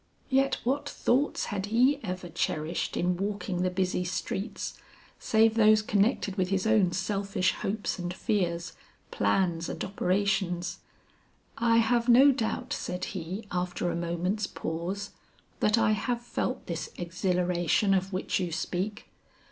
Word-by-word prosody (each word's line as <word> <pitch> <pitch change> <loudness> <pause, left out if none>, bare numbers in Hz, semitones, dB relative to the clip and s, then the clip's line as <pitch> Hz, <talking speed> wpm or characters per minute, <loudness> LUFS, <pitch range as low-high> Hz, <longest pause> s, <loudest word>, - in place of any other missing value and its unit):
Yet 270 +1 +3
what 285 +4 0
thoughts 270 +5 +1
had 195 0 -2
he 255 +6 +3
ever 185 -2 -4
cherished 160 -1 -2
in 175 0 +1
walking 200 -2 -2
the 185 - +2
busy 180 0 0
streets, 190 +4 -4 0.4
save 220 0 +4
those 215 -1 +5
connected 205 -1 +1
with 185 -1 +1
his 190 0 0
own 215 -5 +4
selfish 195 0 0
hopes 205 -1 -3
and 175 0 -3
fears, 175 -3 -1 0.4
plans 165 - +1
and - - -4
operations? 185 -2 0 0.8
"I 230 0 +4
have 235 +1 +2
no 265 +4 +8
doubt," 235 -4 -2
said 180 0 -3
he 185 +4 -5
after 180 -1 -1
a - - -3
moment's 175 +5 -1
pause, 175 +5 -4 0.5
"that 210 +2 +3
I 225 -1 +3
have 235 +3 -1
felt 250 +1 -3
this 170 -2 -4
exhilaration 180 +2 +1
of 190 0 0
which 185 0 -1
you 180 -2 -2
speak. 185 +5 -3
190 Hz, 140 wpm, -28 LUFS, 180-220 Hz, 0.8 s, no